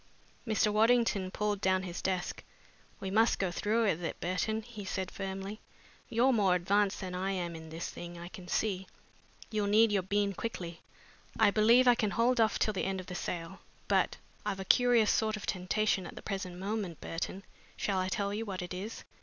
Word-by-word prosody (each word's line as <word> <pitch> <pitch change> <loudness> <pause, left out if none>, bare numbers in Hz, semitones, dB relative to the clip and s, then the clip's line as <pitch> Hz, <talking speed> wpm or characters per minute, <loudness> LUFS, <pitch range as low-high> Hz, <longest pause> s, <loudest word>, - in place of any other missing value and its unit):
Mr. 215 -1 +2
Waddington 220 -3 +3
pulled 205 0 -1
down 190 -1 +2
his 175 -2 -5
desk. 185 -1 -2 0.6
"We 190 - -4
must 225 +3 +4
go 190 -3 0
through 215 +6 +1
with 175 -4 0
it, 165 - -3
Burton," 215 +5 -1
he 215 -3 -8
said 190 0 -3
firmly. 195 +2 -5 0.5
"You're 245 +3 +3
more 195 -5 +4
advanced 200 +3 +1
than 185 -1 -5
I 185 +2 -1
am 175 -3 -3
in 160 0 -9
this 165 +2 -4
thing, 175 0 -8
I 170 0 -7
can 185 -1 -10
see. 190 0 -1 0.6
You'll 210 -2 0
need 215 +2 +5
your 200 -2 +2
bean 200 +2 0
quickly. 175 -5 -5 0.6
I 215 -2 +6
believe 230 +5 +5
I 245 - +8
can 215 -3 0
hold 235 +3 +3
off 220 - +3
till 215 - +1
after 190 -1 -1
the 180 - -8
sale. 175 +1 -4 0.3
But - - +2 0.3
I've 195 - -2
a 190 - -4
curious 240 -1 +5
sort 220 -1 +1
of 210 - -7
temptation 190 0 0
at - - -10
the - - -9
present 190 -3 -4
moment, 195 -3 -3
Burton. 180 +3 -4 0.3
Shall 195 -2 0
I 185 0 0
tell 200 +1 -1
you 215 +2 -2
what 190 -4 -4
it 180 - -6
is?" 200 +5 -6
195 Hz, 195 wpm, -32 LUFS, 185-215 Hz, 0.6 s, I